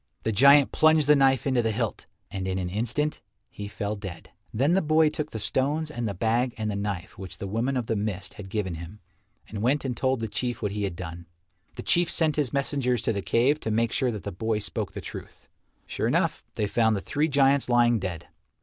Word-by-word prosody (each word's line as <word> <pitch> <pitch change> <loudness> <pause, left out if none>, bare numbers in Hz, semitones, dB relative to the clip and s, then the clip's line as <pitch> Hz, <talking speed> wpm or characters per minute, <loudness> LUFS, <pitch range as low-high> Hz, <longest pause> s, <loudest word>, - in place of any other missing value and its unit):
The 110 - 0
giant 140 +6 +6
plunged 155 -1 +4
the 150 +1 +6
knife 135 -3 +3
into 130 -3 +2
the 115 - 0
hilt, 110 -1 -3 0.2
and 95 -1 -4
in 95 0 -1
an 90 -1 -3
instant 120 +9 -1 0.3
he 105 - -7
fell 105 +1 -3
dead. 95 -5 -9 0.2
Then 140 +9 +2
the 190 - +3
boy 155 0 +3
took 150 -1 -3
the 110 - -6
stones 145 +8 0
and 120 -6 -3
the 100 - -4
bag 115 +5 0
and 110 -1 -2
the - - -3
knife 100 -4 -4
which 95 -2 -8
the - - -6
Woman 115 +7 -1
of 125 - -1
the 110 - -1
Mist 100 -2 -3
had 95 -2 -10
given 100 -3 -2
him 85 +6 -9 0.5
and 105 -1 -6
went 135 +5 +1
and 125 -2 -2
told 130 +1 0
the 115 - -2
Chief 120 +3 -2
what 105 - -2
he 105 0 -2
had 95 -3 -4
done. 85 -1 -8 0.5
The 120 - -7
Chief 175 -1 +3
sent 155 -2 +2
his 145 -5 0
messengers 135 -4 0
to 115 - +1
the 100 - -2
cave 130 +9 +2
to 110 - -4
make 115 +1 +1
sure 130 -3 +1
that 105 -3 -6
the - - -4
boy 110 +4 -1
spoke 105 - -3
the - - -6
truth. - - -10 0.4
Sure - - -2
enough, - - 0
they 105 - 0
found 110 +1 +2
the 100 - -3
three 150 +8 0
giants 140 -2 +3
lying 120 -1 +4
dead. 90 -4 -5
115 Hz, 230 wpm, -26 LUFS, 100-140 Hz, 0.5 s, giant